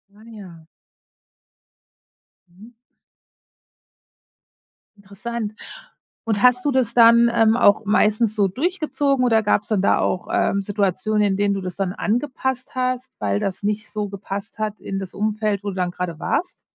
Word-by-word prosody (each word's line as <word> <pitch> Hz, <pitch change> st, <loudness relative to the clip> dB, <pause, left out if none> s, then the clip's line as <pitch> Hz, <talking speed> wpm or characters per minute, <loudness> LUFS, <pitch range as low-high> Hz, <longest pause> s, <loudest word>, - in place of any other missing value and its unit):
Ah, 215 Hz, -, -18 dB
ja. 190 Hz, -8 st, -12 dB, 1.9 s
Mhm. 210 Hz, +7 st, -16 dB, 2.3 s
Interessant. 210 Hz, +2 st, -6 dB, 0.7 s
Und 210 Hz, -3 st, 0 dB
hast 250 Hz, +1 st, +4 dB
du 290 Hz, -, +2 dB
das 255 Hz, -3 st, +1 dB
dann, 235 Hz, 0 st, +6 dB
ähm, 225 Hz, 0 st, +4 dB
auch 205 Hz, -2 st, +4 dB
meistens 215 Hz, +1 st, +2 dB
so 200 Hz, -2 st, +3 dB
durchgezogen 285 Hz, -, -1 dB
oder 225 Hz, -2 st, +3 dB
gab's 210 Hz, 0 st, +1 dB
dann 210 Hz, -4 st, 0 dB
da -, -, +3 dB
auch, 180 Hz, -, -1 dB
ähm, 200 Hz, -, +1 dB
Situationen, 205 Hz, +1 st, 0 dB
in 195 Hz, -2 st, +1 dB
denen 205 Hz, 0 st, +1 dB
du 195 Hz, -, -3 dB
das 185 Hz, -1 st, -6 dB
dann 190 Hz, -2 st, -2 dB
angepasst 260 Hz, +3 st, -2 dB
hast, 255 Hz, 0 st, -2 dB
weil 100 Hz, -1 st, 0 dB
das 190 Hz, -, -3 dB
nicht 210 Hz, +1 st, -2 dB
so 210 Hz, -1 st, -3 dB
gepasst 200 Hz, +1 st, -7 dB
hat 215 Hz, -1 st, -3 dB
in 195 Hz, -, -4 dB
das 190 Hz, -2 st, -7 dB
Umfeld, 210 Hz, -1 st, -1 dB
wo 205 Hz, -, -3 dB
du 195 Hz, -, -6 dB
dann 180 Hz, -1 st, -1 dB
grade 180 Hz, -2 st, -5 dB
warst? 360 Hz, -, -2 dB
210 Hz, 150 wpm, -21 LUFS, 195-235 Hz, 2.3 s, dann